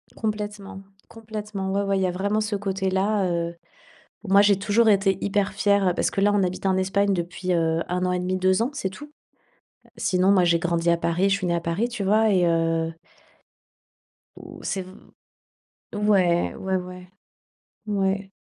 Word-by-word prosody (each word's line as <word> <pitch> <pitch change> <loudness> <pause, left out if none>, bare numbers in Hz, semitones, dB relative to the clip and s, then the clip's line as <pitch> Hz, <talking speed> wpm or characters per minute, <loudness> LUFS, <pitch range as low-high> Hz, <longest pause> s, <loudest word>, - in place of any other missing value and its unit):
Complètement 210 -3 -5 0.3
complètement, 210 -3 -6
ouais, 200 - +1
ouais, 195 -1 0
il - - 0
y 185 - +2
a 180 - -1
vraiment 200 +4 -1
ce 215 -1 -2
côté-là, 195 +1 0
heu. 170 0 -2 0.7
Bon, 195 - -5
moi, 200 - +7
j'ai 200 -1 +4
toujours 210 +3 +2
été 195 -2 +2
hyper 200 -1 0
fière, 200 -2 +2
parce - - 0
que 195 - -1
là, 205 - +4
on 205 -1 +2
habite 185 +1 -3
en 190 -1 +2
Espagne 200 +1 +1
depuis, 180 +1 -3
heu, 165 -1 +1
1,5, 180 +1 -1
2 185 +3 +2
ans, 245 - -1
c'est 195 - -3
tout. 295 +10 -12 0.9
Sinon, 185 +1 +2
moi, 185 -3 +4
j'ai 170 -1 +3
grandi 170 0 0
à 170 - +4
Paris, 170 +3 0
je 195 - +3
suis 185 -3 -3
née 170 - +1
à 170 - 0
Paris, 170 +8 -2
tu 235 -4 -4
vois? 215 +2 +3
Et 180 -3 +3
heu 165 -1 0 1.4
Ou, - - -12
c'est 195 - -2
v 185 +1 -13 1.0
ouais, 195 -5 +2
ouais 190 0 -2
ouais, 180 0 -9 0.8
ouais. 195 -1 -1
190 Hz, 175 wpm, -24 LUFS, 180-205 Hz, 1.4 s, moi